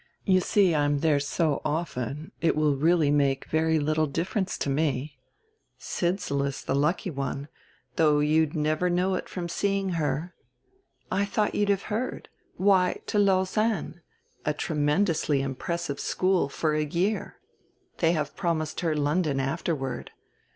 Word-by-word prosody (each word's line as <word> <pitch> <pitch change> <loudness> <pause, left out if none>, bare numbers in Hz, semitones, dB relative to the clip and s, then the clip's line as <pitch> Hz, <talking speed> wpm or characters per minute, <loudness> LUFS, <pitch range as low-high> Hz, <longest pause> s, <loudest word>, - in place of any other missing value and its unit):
You 185 -1 +4
see 185 0 +3
I'm 145 -1 +1
there 155 -3 +3
so 145 +1 0
often 150 -2 -3
it 165 -1 +2
will 150 -2 +2
make 135 - -8 0.3
really 140 -2 +3
very 160 0 +2
little 155 +1 +1
difference 185 +6 -2
to - - -2
me. 140 -1 -1 0.6
Sidsall 175 -5 -1
is 140 -1 -3
the - - -1
lucky 150 +6 +1
one, 140 0 -4 0.5
though 150 -2 +4
you'd 150 +1 +2
never 155 +3 +1
know 180 +2 +1
it 185 - -3
from 175 -2 -4
seeing 195 +2 0
her.... 160 0 -2 0.8
I 195 +2 +2
thought 210 +1 0
you'd 205 -1 +1
have 200 -1 +1
heard 240 +4 -3 0.3
why, 190 -2 +3
to 210 - 0
Lausanne, 195 -2 +1 0.4
a 150 - 0
tremendously 150 -1 +1
impressive 140 +3 -3
school 185 -6 +1
for 155 +2 -1
a 155 0 +1
year. 175 +8 -1 0.6
They 165 0 +3
have 150 -3 -2
promised 160 -4 -1
her 165 -3 0
London 150 -1 +1
afterward. 135 0 -2
160 Hz, 145 wpm, -27 LUFS, 145-185 Hz, 0.8 s, You